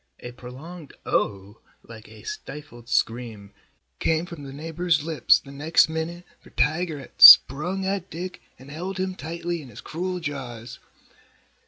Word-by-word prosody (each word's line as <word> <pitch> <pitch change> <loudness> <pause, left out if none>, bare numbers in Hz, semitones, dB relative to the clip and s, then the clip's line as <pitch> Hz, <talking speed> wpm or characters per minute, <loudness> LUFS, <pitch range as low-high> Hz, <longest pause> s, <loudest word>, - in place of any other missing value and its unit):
A 120 - -8
prolonged 135 +7 -11
"Oh!" 100 +1 -2 0.2
like 115 0 -13
a - - -15
stifled 150 - -9
scream 115 -4 -2 0.5
came 160 +1 0
from 170 -4 -10
the 135 - -9
neighbor's 160 +2 -1
lips 160 -1 +3
the 140 - -13
next 155 +3 +2
minute 165 +2 -5
for - - -19
Tiger 160 +1 -1
had 140 - -14
sprung 175 +8 +8
at 195 -1 -3
Dick 180 +3 -7 0.2
and 135 +2 -14
held 180 +5 -6
him 185 0 -2
tightly 170 0 -5
in 135 - -13
his 115 - -12
cruel 180 +3 -4
jaws. 125 -7 -7
155 Hz, 150 wpm, -24 LUFS, 125-175 Hz, 0.5 s, sprung